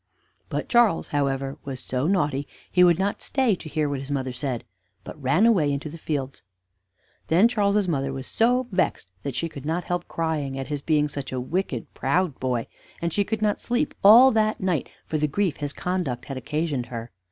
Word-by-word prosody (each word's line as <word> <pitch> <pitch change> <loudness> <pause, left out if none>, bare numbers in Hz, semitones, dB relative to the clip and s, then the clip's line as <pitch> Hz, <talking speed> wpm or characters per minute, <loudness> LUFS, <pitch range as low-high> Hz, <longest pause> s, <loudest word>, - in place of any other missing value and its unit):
But - - -3
Charles, 235 -8 +3
however, 135 -1 -1
was 135 -2 -5
so 130 +3 -1
naughty 145 -7 +1 0.2
he 180 - +5
would 175 -2 +5
not 195 +2 -1
stay 260 -5 +2
to 170 -3 -6
hear 155 -1 0
what 140 -1 -2
his 135 +1 -7
mother 130 -3 -2
said, 125 -2 -3 0.4
but 150 - -10
ran 140 - +3
away 180 -11 +4
into 140 +2 -3
the 165 - -8
fields. 140 -4 -3 0.9
Then 180 +8 +5
Charles's 205 -4 +1
mother 135 -5 0
was 135 -1 -5
so 245 +2 +2
vexed 180 - -1
that 140 -3 -4
she 165 - -1
could 140 -4 -9
not 165 +4 -1
help 175 0 -3
crying 155 -5 -2
at 135 +1 -5
his 145 -2 -3
being 150 -1 +2
such 140 -2 -6
a 130 - -2
wicked, 135 - -2
proud 165 +2 0
boy; 125 -3 -1 0.3
and 170 -1 -2
she 205 - +2
could 215 +1 -2
not 210 -1 +1
sleep 245 +5 0
all 235 +6 +9
that 215 -1 +1
night 180 -7 -1 0.2
for 155 - -2
the 150 - +2
grief 180 +1 0
his 145 -1 -3
conduct 150 -9 -2
had 135 - -5
occasioned 140 -1 -2
her. 115 -1 -6
155 Hz, 200 wpm, -25 LUFS, 135-190 Hz, 0.9 s, all